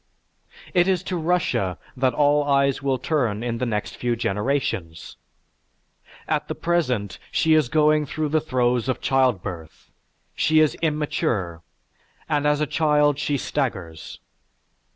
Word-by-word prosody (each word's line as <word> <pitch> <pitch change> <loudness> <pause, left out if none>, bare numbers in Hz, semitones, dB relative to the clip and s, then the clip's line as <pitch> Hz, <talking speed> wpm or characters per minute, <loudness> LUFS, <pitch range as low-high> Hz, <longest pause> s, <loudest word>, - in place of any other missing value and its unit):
It 175 0 +4
is 185 -2 +1
to 185 - -3
Russia 160 - 0 0.2
that 130 -2 +1
all 145 0 +3
eyes 140 -1 +2
will 135 -1 0
turn 120 -6 -1
in 115 -1 -3
the 125 - -1
next 105 -2 -3
few 120 -1 -1
generations. 105 - -2 1.1
At - - -1
the - - -4
present, 130 - -1
she 160 - +3
is 155 -5 +3
going 150 0 +3
through 155 +2 -2
the 155 +1 +1
throes 125 -4 0
of 130 - -1
childbirth. 100 -11 -1 0.4
She 155 0 +3
is 155 -2 +4
immature, 150 - -1 0.7
and 150 -1 +1
as 150 0 +2
a - - +2
child 150 -1 +2
she 145 -1 0
staggers. 95 - -4
140 Hz, 135 wpm, -23 LUFS, 115-150 Hz, 1.1 s, It